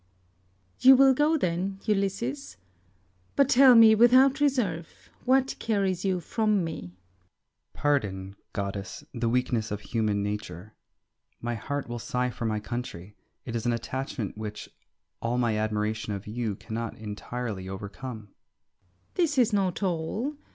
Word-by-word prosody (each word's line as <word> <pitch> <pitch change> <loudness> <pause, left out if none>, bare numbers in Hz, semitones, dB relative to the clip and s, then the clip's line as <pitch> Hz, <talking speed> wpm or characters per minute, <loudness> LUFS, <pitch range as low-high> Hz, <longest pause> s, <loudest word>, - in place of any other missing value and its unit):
Circe. - - -11
You 265 +1 +11
will 270 0 +6
go 300 +4 +3
then, 190 - -1
Ulysses, 145 - -2 0.8
but 280 - +4
tell 265 -2 +7
me, 225 -1 +9
without 255 +5 +6
reserve, 225 - -1
what 265 +1 +3
carries 195 -5 0
you 190 -2 +1
from 210 +1 +1
me? 165 -1 -3
Ulysses. 90 - -9 0.8
Pardon, 100 -10 -1 0.2
goddess, 100 0 -5
the 115 -1 -1
weakness 120 -2 0
of 105 0 -4
human 105 -4 -1
nature. 105 -1 -5 0.7
My 120 0 -3
heart 145 +5 -4
will 120 0 -5
sigh 125 +2 -1
for 120 - -5
my 110 -1 0
country. 105 -4 -6 0.3
It 120 - -5
is 115 +1 -2
an 120 - +2
attachment 120 -3 -4
which 105 -1 -7 0.5
all 120 +1 -1
my 120 -3 +1
admiration 110 0 -1
of 100 0 -6
you 110 -1 -3
cannot 115 +2 -5
entirely 105 -2 -5
overcome. 105 +3 -7
Circe. 90 -1 -42
This 325 -5 +1
is 240 -3 +4
not 195 -1 0
all. 190 - -1
125 Hz, 145 wpm, -27 LUFS, -, 0.8 s, You